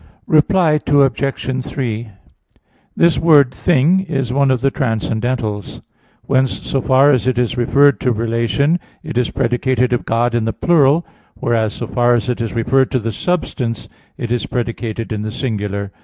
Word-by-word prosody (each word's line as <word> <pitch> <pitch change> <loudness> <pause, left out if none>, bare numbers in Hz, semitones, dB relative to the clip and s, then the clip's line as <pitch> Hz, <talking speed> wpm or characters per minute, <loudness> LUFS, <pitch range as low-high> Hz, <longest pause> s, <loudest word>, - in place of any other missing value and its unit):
Reply 155 0 +3
Obj. 135 -2 +1
3: 120 -5 -4 0.9
This 170 0 +3
word 145 -6 +4
"thing" 170 +5 +2
is 135 -9 -3
one 140 0 +2
of 130 -2 +1
the 135 +1 +1
transcendentals. 110 -4 -2 0.4
Whence, 130 -1 0
so 135 - -1
far 135 +3 +4
as 130 -2 +1
it 130 -2 +1
is 120 -1 0
referred 140 +3 +3
to 125 - 0
relation, 115 - 0 0.2
it 155 -1 -7
is 125 -1 +1
predicated 125 0 0
of 120 - -2
God 120 +1 0
in 120 -2 0
the 115 - -1
plural; 160 +1 +3 0.3
whereas, 110 -2 -1
so - - -5
far 120 -1 +2
as 120 +2 -2
it 125 - -2
is 115 - -3
referred 125 +3 +1
to - - 0
the 115 -1 -3
substance, 125 - -3 0.3
it 120 - -5
is 120 -3 -1
predicated 115 -2 -4
in 105 - -3
the 110 0 -4
singular. 105 -5 -3
125 Hz, 165 wpm, -17 LUFS, 115-140 Hz, 0.9 s, word